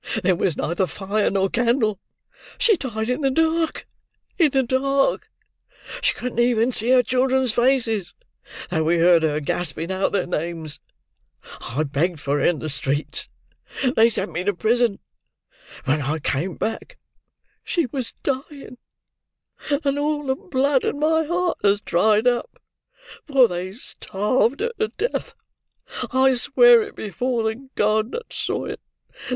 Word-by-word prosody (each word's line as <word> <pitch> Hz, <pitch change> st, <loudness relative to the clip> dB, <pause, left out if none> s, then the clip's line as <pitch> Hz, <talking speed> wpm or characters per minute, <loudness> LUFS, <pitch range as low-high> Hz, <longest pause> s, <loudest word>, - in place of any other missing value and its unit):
There 185 Hz, +1 st, +4 dB
was 170 Hz, -2 st, -1 dB
neither 175 Hz, +3 st, 0 dB
fire 205 Hz, +3 st, -1 dB
nor 195 Hz, 0 st, +1 dB
candle; 230 Hz, -2 st, +1 dB, 0.6 s
she 460 Hz, -4 st, +4 dB
died 220 Hz, -, -4 dB
in 250 Hz, +4 st, -1 dB
the 275 Hz, -, +2 dB
dark—in 325 Hz, +1 st, -1 dB
the 270 Hz, -1 st, +2 dB
dark! 275 Hz, -, +1 dB, 0.7 s
She -, -, +1 dB
couldn't 250 Hz, -1 st, -4 dB
even 240 Hz, 0 st, +3 dB
see 230 Hz, 0 st, -2 dB
her 255 Hz, -1 st, +5 dB
children's 255 Hz, -1 st, +1 dB
faces, 240 Hz, -6 st, +1 dB, 0.6 s
though 160 Hz, -3 st, +1 dB
we 170 Hz, +2 st, +2 dB
heard 170 Hz, 0 st, +5 dB
her 155 Hz, -1 st, 0 dB
gasping 165 Hz, +3 st, -3 dB
out 190 Hz, +1 st, 0 dB
their 195 Hz, -3 st, 0 dB
names. 165 Hz, -2 st, -4 dB, 0.8 s
I 135 Hz, +6 st, -2 dB
begged 155 Hz, +4 st, -1 dB
for 140 Hz, +1 st, -1 dB
her -, -, -1 dB
in 175 Hz, -, +3 dB
the 155 Hz, -, -5 dB
streets: 145 Hz, 0 st, -3 dB, 0.5 s
and 255 Hz, -1 st, +1 dB
they 225 Hz, +1 st, +6 dB
sent 210 Hz, -3 st, -2 dB
me 175 Hz, -, -3 dB
to 205 Hz, 0 st, 0 dB
prison. 230 Hz, +1 st, +1 dB, 0.9 s
When 145 Hz, +3 st, +1 dB
I 145 Hz, +4 st, -1 dB
came 160 Hz, +4 st, -2 dB
back, 225 Hz, -, -4 dB, 0.7 s
she 340 Hz, -4 st, 0 dB
was 255 Hz, 0 st, -5 dB
dying; 275 Hz, -1 st, -4 dB, 1.1 s
and 280 Hz, 0 st, +1 dB
all 295 Hz, 0 st, -1 dB
the 265 Hz, -, +1 dB
blood 280 Hz, -6 st, 0 dB
in 285 Hz, -, -2 dB
my 320 Hz, +1 st, +2 dB
heart 350 Hz, +2 st, -1 dB
has 200 Hz, 0 st, +3 dB
dried 210 Hz, +4 st, +2 dB
up, 250 Hz, -, 0 dB, 0.7 s
for 270 Hz, -4 st, +5 dB
they 180 Hz, 0 st, -5 dB
starved 230 Hz, -, -1 dB
her 470 Hz, +1 st, 0 dB
to 435 Hz, -, +1 dB
death. 465 Hz, +4 st, -4 dB, 0.8 s
I 265 Hz, 0 st, +4 dB
swear 475 Hz, -, +5 dB
it 420 Hz, -, -7 dB
before 240 Hz, +3 st, -2 dB
the 225 Hz, +5 st, -4 dB
God 215 Hz, +3 st, +1 dB
that 475 Hz, -, -6 dB
saw -, -, -2 dB
it! -, -, -6 dB
235 Hz, 150 wpm, -22 LUFS, 180-275 Hz, 1.1 s, they